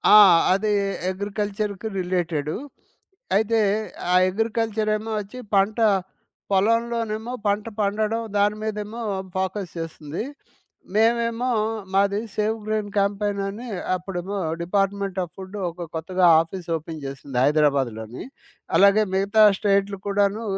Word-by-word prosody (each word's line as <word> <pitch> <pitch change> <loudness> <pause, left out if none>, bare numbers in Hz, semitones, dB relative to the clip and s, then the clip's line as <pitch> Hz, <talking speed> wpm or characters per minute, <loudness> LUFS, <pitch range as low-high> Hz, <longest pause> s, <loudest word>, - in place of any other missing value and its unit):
ఆ! - - +11 0.4
అది 210 +3 +1 0.4
అగ్రికల్చర్‌కి 205 +1 -3
రిలేటెడు. 170 -5 -1 0.8
అయితే 225 +1 +2 0.5
ఆ - - +5 0.2
అగ్రికల్చరేమో 220 0 -1
అచ్చి, 210 +5 -10 0.2
పంట 200 +3 +3 0.7
పొలంలోనేమో 230 +2 +1
పంట 205 +1 +1 0.2
పండడం, 215 +3 0 0.2
దాని 205 +1 +3
మీదేమో 215 +1 -4 0.4
ఫోకస్ 190 -1 -2
జేస్తుంది. 160 +1 -5 0.7
మేమేమో 230 +2 +2 0.4
మాది 200 +1 +3 0.2
సేవ్ 215 +1 0
గ్రైన్ 215 -1 -1
క్యాంపెయిన్ 200 0 0
అని, 225 +5 -7 0.3
అప్పుడేమో 185 +2 -4 0.2
డిపార్ట్‌మెంట్ 195 +1 0
ఆఫ్ 170 -1 -9
ఫుడ్ 190 +2 -8
ఒక 170 0 -7
కొత్తగా 180 +3 +1 0.2
ఆఫీస్ 170 +2 -7
ఓపెన్ 160 0 -8
చేసింది. 135 -1 -6
హైదరాబాద్‌లోని. 135 -6 +1 0.5
అలాగే 200 +2 +6
మిగతా 200 +3 +4 0.2
స్టేటులు 200 -1 +1
కూడాను, 200 +2 +1
200 Hz, 105 wpm, -23 LUFS, 180-215 Hz, 0.8 s, ఆ